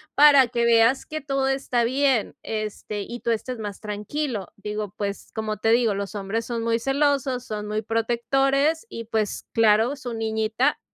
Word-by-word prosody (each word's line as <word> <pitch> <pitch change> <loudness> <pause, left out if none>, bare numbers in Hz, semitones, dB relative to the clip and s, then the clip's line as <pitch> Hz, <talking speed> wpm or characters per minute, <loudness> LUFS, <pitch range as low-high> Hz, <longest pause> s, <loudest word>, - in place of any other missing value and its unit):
para 285 -3 +7
que 235 0 0
veas 230 +3 +4
que 310 0 -5
todo 275 -1 -1
está 270 -3 0
bien, 260 -1 +1
este, 215 -1 -4
y 240 +4 -6
tú 235 - -1
estés 235 +2 -3
más 205 -2 -6
tranquilo”. 210 - -3
Digo, 210 -1 -5
pues, 200 -1 -4
como 215 -1 -3
te 225 - 0
digo, 230 -3 +3
los 200 +1 -4
hombres 205 +3 -2
son 230 -2 -3
muy 230 0 +1
celosos, 270 -1 +1
son 210 -1 -5
muy 215 +1 -1
protectores, 270 - +1
y, 230 - -7
pues, 220 -2 -2
claro, 225 +4 +4
su 245 -3 -6
niñita. 220 +4 0
230 Hz, 170 wpm, -24 LUFS, 215-265 Hz, -, para